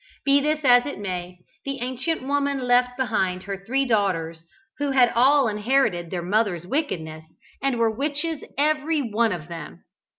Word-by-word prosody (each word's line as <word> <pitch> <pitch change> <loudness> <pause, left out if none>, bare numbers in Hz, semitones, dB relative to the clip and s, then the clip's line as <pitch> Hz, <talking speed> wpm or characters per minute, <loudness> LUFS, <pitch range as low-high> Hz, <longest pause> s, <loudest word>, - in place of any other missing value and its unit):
Be 280 0 +5
this 305 +1 0
as 245 +1 +6
it 285 - -5
may, 180 -2 -5 0.3
the 275 -1 -4
ancient 260 +6 -2
woman 280 0 0
left 250 0 +3
behind 190 -7 -1
her 195 0 -6
three 270 +6 0
daughters, 175 -8 0 0.4
who 290 0 0
had 255 -3 +4
all 270 +2 +4
inherited 210 -5 +1
their 175 -1 -4
mother's 190 -2 0
wickedness, 160 - -3 0.4
and 270 -3 0
were 230 -1 +2
witches 295 +3 -2
every 300 +1 +1
one 230 -1 +1
of 170 -5 -5
them. 85 - -9
245 Hz, 160 wpm, -24 LUFS, 185-275 Hz, 0.4 s, as